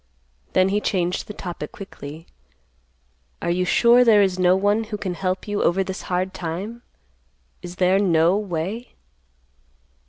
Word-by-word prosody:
Then 185 Hz, 0 st, +4 dB
he 205 Hz, +2 st, 0 dB
changed 180 Hz, -3 st, -1 dB
the 210 Hz, -, -7 dB
topic 175 Hz, -5 st, -6 dB
quickly. 160 Hz, -5 st, -10 dB, 1.1 s
"Are 170 Hz, -, -1 dB
you 180 Hz, +1 st, 0 dB
sure 240 Hz, +6 st, +5 dB
there 215 Hz, -4 st, +6 dB
is 185 Hz, -1 st, 0 dB
no 180 Hz, 0 st, +4 dB
one 205 Hz, +3 st, +1 dB
who 210 Hz, -1 st, -5 dB
can 190 Hz, -3 st, -3 dB
help 185 Hz, +3 st, -3 dB
you 205 Hz, 0 st, -1 dB
over 190 Hz, +3 st, +2 dB
this 190 Hz, 0 st, -6 dB
hard 185 Hz, +1 st, -1 dB
time? 185 Hz, +8 st, -5 dB, 0.8 s
Is 175 Hz, 0 st, -8 dB
there 185 Hz, +1 st, +3 dB
no 170 Hz, -2 st, +3 dB
way?" 200 Hz, +4 st, -4 dB
185 Hz, 150 wpm, -22 LUFS, 175-205 Hz, 1.1 s, there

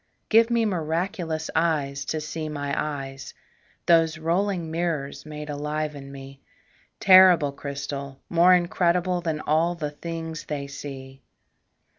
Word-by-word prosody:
Give 225 Hz, +1 st, +5 dB
me 235 Hz, -1 st, +2 dB
miraculous 165 Hz, -2 st, -2 dB
eyes 145 Hz, -4 st, 0 dB
to 155 Hz, -, -2 dB
see 155 Hz, +1 st, -5 dB
my 145 Hz, -1 st, -3 dB
eyes, 135 Hz, -3 st, -5 dB, 0.5 s
Those 165 Hz, -2 st, +4 dB
rolling 170 Hz, +1 st, -1 dB
mirrors 155 Hz, -4 st, -3 dB
made 150 Hz, 0 st, -7 dB
alive 150 Hz, +1 st, -3 dB
in 140 Hz, -1 st, -9 dB
me, 135 Hz, 0 st, -11 dB, 0.6 s
Terrible 185 Hz, -6 st, +7 dB
crystal 140 Hz, -1 st, -6 dB
more 175 Hz, +2 st, +5 dB
incredible 175 Hz, 0 st, +1 dB
Than 160 Hz, -3 st, -2 dB
all 165 Hz, +3 st, +1 dB
the 150 Hz, -3 st, -4 dB
things 165 Hz, +1 st, -6 dB
they 145 Hz, -2 st, -4 dB
see. 135 Hz, -1 st, -9 dB
155 Hz, 125 wpm, -25 LUFS, 140-170 Hz, 0.6 s, Terrible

